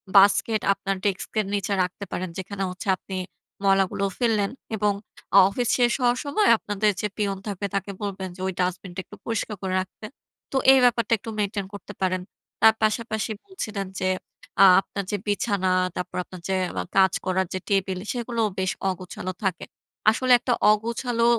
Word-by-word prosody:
Basket 200 +2 +5
আপনার 195 0 -3
ডেস্কের 205 +2 -1
নিচে 200 0 0
রাখতে 180 +3 -5
পারেন, 185 0 -3
যেখানে 195 +1 -4
হচ্ছে 185 +4 -8
আপনি 190 - -8 0.5
ময়লাগুলো 195 0 +2
ফেললেন। 220 -5 +1 0.2
এবং 210 -1 +2 0.4
আ - - +9
অফিস 240 +4 -1
শেষ 240 -1 +4
হওয়ার 245 0 +3
সময়, 410 +9 +2
আপনাদের 210 0 0
যে 210 - 0
পিয়ন 200 -2 0
থাকবে, 200 -1 -3
তাকে 195 0 -2
বলবেন 190 -2 -4
যে, - - -16
ওই 190 - -2
ডাস্টবিনটা 180 0 -2
একটু - - -12
পরিষ্কার 225 -2 -2
করে 190 -1 -2
রাখতে। 190 +3 -10 0.5
তো, - - -6 0.2
এই 270 - +7
ব্যাপারটা 235 -2 +3
একটু 225 - -8
মেইনটেইন 200 -1 -1
করতে 200 +1 -9
পারেন। 185 -1 +1 0.4
তার 220 0 +8
পাশাপাশি 220 0 0
বলছিলেন 215 - -5
যে 185 -1 +1 0.5
আ - - +11 0.2
আপনার 200 0 -5
যে 205 - 0
বিছানা, 200 -2 +1 0.2
তারপর 180 - -4
আপনার 180 -1 -11
যে 190 - +2 0.3
আ - - -3
কাজ 190 -1 +6
করার 185 0 +1
যে 185 - -2
টেবিল, 195 -2 +1 0.2
সেগুলোও 235 -2 -1
বেশ 190 -1 +1 0.2
অগোছালো 185 0 -5
থাকে। 185 -4 -1 0.5
আসলে, 255 +3 0
একটা 245 - 0 0.2
অগোছালো 230 +2 0
200 Hz, 170 wpm, -25 LUFS, 190-220 Hz, 0.5 s, আ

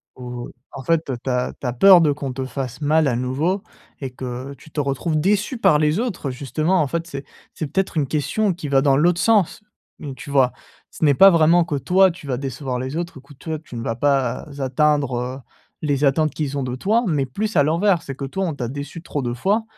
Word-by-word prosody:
ou 125 -1 -7 0.2
en 135 - -8
fait, 165 +1 0
heu, 130 - -2
tu - - -3
as 125 0 0
tu 130 - -4
as 120 - -1
peur 180 +8 +8
de 150 -3 +3
qu'on 140 -2 -5
te 130 0 -4
fasse 130 -1 -5
mal 155 +1 +3
à 120 - 0
nouveau 150 +11 -1 0.4
et 135 -3 -5
que 130 +2 -6
tu 155 - -17
te 150 - -4
retrouves 145 +3 -1
déçu 210 - +1
par 155 -9 +4
les 155 +5 +2
autres 190 - -3
justement 155 +7 0
en 150 - +1
fait. 170 +3 -3
C'est 140 -4 -7 0.3
c'est 155 - -4
peut-être 190 +4 -1
une 145 -3 +1
question 170 +9 0
qui 165 -4 -6
va 135 -1 +4
dans 135 -1 +4
l'autre 170 +3 +3
sens, 220 -2 +2 0.4
donc 140 -4 -7
tu 140 - -10
vois? 135 -3 +3 0.4
Ce - - -7
n'est 145 -2 +5
pas 195 +8 +8
vraiment 170 +1 +4
que 155 - -2
toi 180 +7 +4
tu 160 -3 -12
vas 125 -3 -1
décevoir 130 -1 -4
les 130 +3 -4
autres 170 -2 -4
ou - - -11
que 140 +2 -16
toi 155 +3 -5
tu 155 -5 -12
ne 115 - -4
vas 115 - -2
pas 135 0 0
atteindre, 140 0 +1
heu, 125 +2 -4 0.4
les 145 -2 0
attentes 155 +2 +2
qu'ils 145 -2 -3
ont 140 - -1
de 125 -1 -3
toi 215 - +1
mais 145 -6 0
plus 210 +11 -3
à 145 - +6
l'envers. 170 +4 +2
C'est 135 - -7
que 135 - -5
toi 190 +8 -2
on 165 -4 -3
t'a 125 -4 -3
déçu 145 +5 -7
trop 145 - -3
de 120 -2 -2
fois 200 - +1
145 Hz, 245 wpm, -21 LUFS, 130-170 Hz, 0.4 s, peur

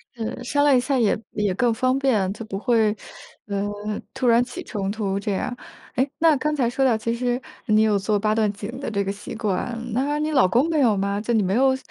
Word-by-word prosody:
是， 230 +2 -5
商 285 +3 +1
量 285 -2 +5
一 - - +4
下 265 +1 0
也 215 -2 +2
也 210 -3 0
更 240 0 +2
方 255 +3 +1
便， 220 -9 +1
就 220 +1 -8
不 195 -3 -5
会， 220 -3 +2 0.5
呃， 200 0 -2 0.5
突 255 - -1
然 235 +1 +5
起 245 - -7
冲 200 -3 -3
突 200 -2 -2
这 205 -1 -2
样。 245 +5 -2 0.4
哎， 260 +2 +2
那 320 -2 +5
刚 300 +3 -1
才 245 -4 +1
说 270 +2 +1
到 240 -3 +4
其 230 +1 -2
实 245 +1 -1 0.2
你 215 -1 +4
有 215 -2 +3
做 205 +1 0
八 215 +1 +1
段 215 -2 +2
锦 200 +2 -7
的 275 - -4
这 200 -1 0
个 195 - -2
习 200 +1 -8
惯， 220 +2 -2 0.2
那 285 +4 0
你 305 +1 -1
老 265 -10 +4
公 255 - +2
没 315 -2 +1
有 225 -5 +4
吗？ 200 +1 -1
就 235 +3 -2
你 220 - +3
没 190 +2 0
有， 265 +1 +4
225 Hz, 255 characters per minute, -23 LUFS, 205-260 Hz, 0.5 s, 量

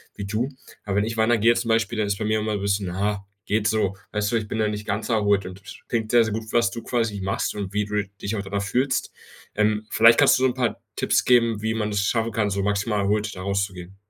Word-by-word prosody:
wie 100 - -5
du. 110 +6 -1 0.3
Aber 100 -2 -3
wenn 100 - +3
ich 115 +1 -4
wandern 115 +1 +2
gehe 115 +2 +6
jetzt 115 0 +1
zum 115 - -4
Beispiel, 115 0 +1
dann 105 - +1
ist 100 -1 -1
bei 110 - -3
mir 110 0 +1
immer 110 0 -2
'n 105 - -2
bisschen: 100 -2 -1
„Ha, 100 0 -1 0.2
geht 105 0 +1
so.“ 105 -3 +1 0.2
Weißt 105 +1 0
du, 115 - +2
ich 110 -1 -4
bin 110 - -4
da 110 -1 +1
nicht 105 0 -5
ganz 100 +4 -2
erholt 105 -4 +2
und 95 +1 -9
k - - -12 0.2
klingt 110 -2 -1
sehr, 120 -1 +6
sehr 110 -2 -2
gut, 110 0 -5
was 115 -5 +2
du 115 - -6
quasi 115 -4 -1
machst 95 +1 -1
und 100 -2 -4
wie 105 0 0
du 105 0 -1 0.2
dich 100 +2 -2
auch 100 - -2
danach 100 0 -3
fühlst. 125 +6 0 0.4
Ähm, 105 0 +1
vielleicht 115 +1 +6
kannst 145 -3 +5
du - - 0
so - - +6
'n 125 - -4
paar 125 -3 -1
Tipps - - +1
geben, 115 -3 +3
wie 110 +1 -1
man 105 -1 -1
es 100 -1 0
schaffen 115 +3 0
kann, 105 -1 0
so 100 0 -1
maximal 100 +1 0
erholt 105 +2 0
da 95 - -7
rauszugehen. 95 -2 -3
105 Hz, 270 wpm, -24 LUFS, 100-115 Hz, 0.4 s, gehe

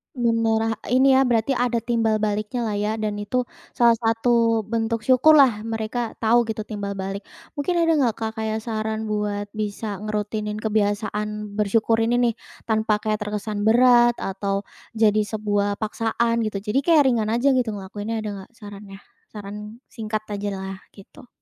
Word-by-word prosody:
Benar 230 -2 +1
lah 225 0 0 0.2
ini 265 +1 +5
ya, 265 0 +4
berarti 235 +1 +1
ada 245 -3 0
timbal 230 -2 +1
baliknya 215 +3 -1
lah 220 - -2
ya, 210 +1 -1
dan 215 -1 -3
itu 250 +5 -1 0.3
salah 235 -2 +4
satu 230 0 +2
bentuk 225 +1 -2
syukurlah 260 -2 +5
mereka 225 +1 -3
tahu 235 +1 +4
gitu 220 -1 -3
timbal 205 -2 -5
balik. 195 +1 -4 0.4
Mungkin 350 +5 0
ada 335 -1 +3
enggak 235 -5 +2
Kak 220 -1 -3
kayak 220 0 -2
saran 220 -1 -3
buat 205 -1 -2
bisa 210 -1 -4
ngerutinin 210 0 -3
kebiasaan 210 0 -1
bersyukur 225 +2 +2
ini 230 +2 +2 0.2
nih, - - -12 0.3
tanpa 220 -1 +1
kayak 215 -1 -1
terkesan 210 0 -2
berat 240 +1 +5
atau 195 0 -3 0.3
jadi 215 -1 +3
sebuah 205 -1 -1
paksaan 225 +2 -1
gitu? 200 -2 -5
Jadi 215 +5 +1
kayak 310 +1 +4
ringan 225 -3 0
aja 240 +5 +2
gitu 250 -5 0
ngelakuinnya 205 +3 -5
ada 210 - -3
enggak 190 - -13
sarannya? 205 -2 -11 0.4
Saran 210 +3 -8
singkat 215 -2 -4
aja 205 0 -3
lah, 190 0 -6 0.2
gitu. 245 +6 -15
220 Hz, 160 wpm, -23 LUFS, 210-235 Hz, 0.4 s, ini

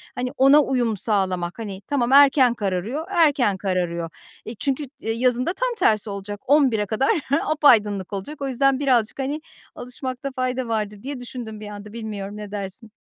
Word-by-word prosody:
hani, 250 0 -2
ona 275 +3 +7
uyum 245 -6 0
sağlamak. 185 -3 -1
Hani, 200 -4 -6
tamam, 255 -4 0
erken 275 -3 +6
kararıyor, 210 - -3
erken 290 - +3
kararıyor. 175 -3 -2 0.4
Eee, 225 - -7
çünkü 275 +1 -1
t 285 - -20
eee, - - +1
yazın 250 +1 +1
da 345 - 0
tam - - -1
tersi 215 - +2
olacak. 200 +1 -6
11'e 260 -7 +3
kadar 220 +7 0 0.4
apaydınlık 210 - +3
olacak. 235 +10 -6
O 275 - -1
yüzden 270 +1 +2
birazcık, 250 -5 +1
hani, 285 +3 -2 0.3
alışmakta 255 +2 -5
fayda 255 -1 -2
vardır 210 -2 -3
diye 275 0 -5
düşündüm 240 -3 -7
bir 210 - -8
anda. 205 0 -9
Bilmiyorum, 210 -3 -6
ne 210 -1 -8
dersin? 205 +2 -5
235 Hz, 170 wpm, -23 LUFS, 205-270 Hz, 0.4 s, ona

